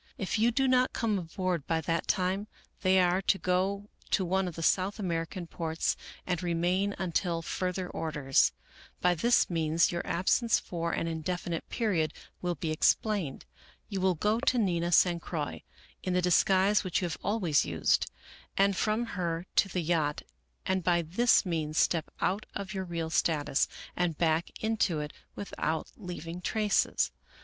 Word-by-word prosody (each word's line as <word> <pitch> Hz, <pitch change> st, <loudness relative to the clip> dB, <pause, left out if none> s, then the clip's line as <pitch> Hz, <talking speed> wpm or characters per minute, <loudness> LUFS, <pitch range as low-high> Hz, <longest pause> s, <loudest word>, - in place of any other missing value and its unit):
If 190 Hz, +1 st, -2 dB
you 230 Hz, +2 st, +4 dB
do 265 Hz, +3 st, +1 dB
not 255 Hz, 0 st, +3 dB
come 215 Hz, -4 st, 0 dB
aboard 175 Hz, -2 st, -3 dB
by 165 Hz, -1 st, +1 dB
that 165 Hz, +2 st, -1 dB
time, 190 Hz, +2 st, 0 dB, 0.3 s
they 190 Hz, 0 st, +4 dB
are 180 Hz, +1 st, +3 dB
to 195 Hz, -, +2 dB
go 190 Hz, +3 st, 0 dB, 0.2 s
to 190 Hz, -, +2 dB
one 190 Hz, +1 st, +1 dB
of 175 Hz, -, -6 dB
the 165 Hz, -, -5 dB
South 190 Hz, +5 st, +2 dB
American 170 Hz, -2 st, -3 dB
ports 165 Hz, 0 st, -1 dB, 0.3 s
and 180 Hz, -3 st, -1 dB
re 175 Hz, -2 st, -1 dB
main 185 Hz, +4 st, +1 dB
until 170 Hz, -2 st, -1 dB
further 180 Hz, +2 st, -2 dB
orders. 150 Hz, -6 st, +1 dB, 0.5 s
By 180 Hz, 0 st, +3 dB
this 235 Hz, +9 st, +3 dB
means 165 Hz, -1 st, +2 dB
your 175 Hz, 0 st, -2 dB
absence 210 Hz, +6 st, +2 dB
for 170 Hz, -1 st, -3 dB
an -, -, -1 dB
indefinite 165 Hz, +1 st, -3 dB
period 185 Hz, -10 st, 0 dB, 0.3 s
will 175 Hz, -1 st, -1 dB
be 160 Hz, -2 st, -3 dB
explained. 170 Hz, -1 st, +1 dB, 0.4 s
You 195 Hz, -3 st, -3 dB
will 185 Hz, -1 st, +3 dB
go 210 Hz, +7 st, +1 dB
to 255 Hz, -1 st, +2 dB
Nina 175 Hz, -6 st, +1 dB
San 175 Hz, 0 st, +4 dB
Croix 155 Hz, -4 st, -4 dB, 0.4 s
in 185 Hz, -, -2 dB
the 180 Hz, -, +3 dB
disguise 190 Hz, +3 st, +4 dB
which 185 Hz, +1 st, -1 dB
you -, -, +2 dB
have 170 Hz, -, -4 dB
always 190 Hz, -8 st, +2 dB
used, 85 Hz, -2 st, +1 dB, 0.5 s
and 195 Hz, 0 st, +4 dB
from 215 Hz, +5 st, 0 dB
her 175 Hz, -5 st, -3 dB
to 195 Hz, -, +4 dB
the 180 Hz, 0 st, -1 dB
yacht, 155 Hz, -3 st, 0 dB, 0.4 s
and 190 Hz, -1 st, 0 dB
by 170 Hz, 0 st, +2 dB
this 215 Hz, +9 st, +3 dB
means 155 Hz, -3 st, -2 dB
step 165 Hz, -3 st, +2 dB
out 195 Hz, +4 st, 0 dB
of 195 Hz, -1 st, -4 dB
your 190 Hz, -1 st, -3 dB
real 165 Hz, -2 st, -3 dB
status 150 Hz, -3 st, +1 dB, 0.3 s
and 175 Hz, -3 st, 0 dB
back 165 Hz, 0 st, +1 dB
into 215 Hz, -7 st, +1 dB
it 150 Hz, 0 st, -5 dB, 0.2 s
without 160 Hz, -5 st, -3 dB
leaving 175 Hz, -2 st, -7 dB
traces. 210 Hz, +2 st, +1 dB
180 Hz, 165 wpm, -30 LUFS, 165-195 Hz, 0.5 s, you